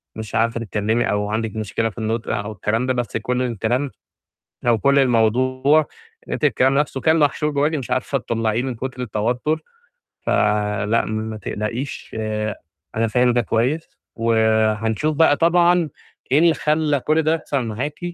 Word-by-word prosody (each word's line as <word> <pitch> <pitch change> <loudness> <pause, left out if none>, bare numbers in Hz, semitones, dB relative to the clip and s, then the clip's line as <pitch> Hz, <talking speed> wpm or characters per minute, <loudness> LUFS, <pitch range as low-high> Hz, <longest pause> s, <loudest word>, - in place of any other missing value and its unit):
مش 110 -2 -6
عارفة 115 +1 +1
تتكلّمي 110 +1 0
أو 105 0 -1
عندِك 110 0 -2
مشكلة 110 +1 -1
في 105 - -16
النُطق 110 0 -2
أو 105 0 -4
الكلام 110 +4 -1
ده، 130 - +2
بس 120 -3 -2
كُلّ 125 +3 -1
الكلام 125 +3 -1 0.8
أو 115 -2 +4
كُلّ 140 +4 +3
الموضوع 130 +4 +3 0.4
إن - - -6
أنتِ - - -2
الكلام 130 +1 +3
نفسه 140 -2 -1
كان 160 +3 +3
محشور 150 0 +1
جواكِ 150 +2 +1
مش 135 -5 -4
عارفة 135 +2 0
تطلّعيه 115 -1 -1
من 130 -2 -3
كُتر 130 +2 -5
التوتر، 125 +8 -1 0.6
ف - - -5 0.6
لأ 115 +2 +1
ما 110 0 -4
تقلقيش، 110 +6 -5 0.8
أنا 115 +1 +1
فاهم 125 +2 +2
ده 120 - +3
كويس، 125 +9 -1 0.3
وحنشوف 110 +3 +1
بقى 145 -1 +4
طبعًا 175 0 +3 0.4
إيه 145 - +5
اللي 165 0 +5
خلّى 150 -2 +1
كُلّ 155 +4 +2
ده 160 +1 +2
يحصل 140 -5 -2
معاكِ، 125 +7 -4
120 Hz, 160 wpm, -21 LUFS, 110-145 Hz, 0.8 s, إيه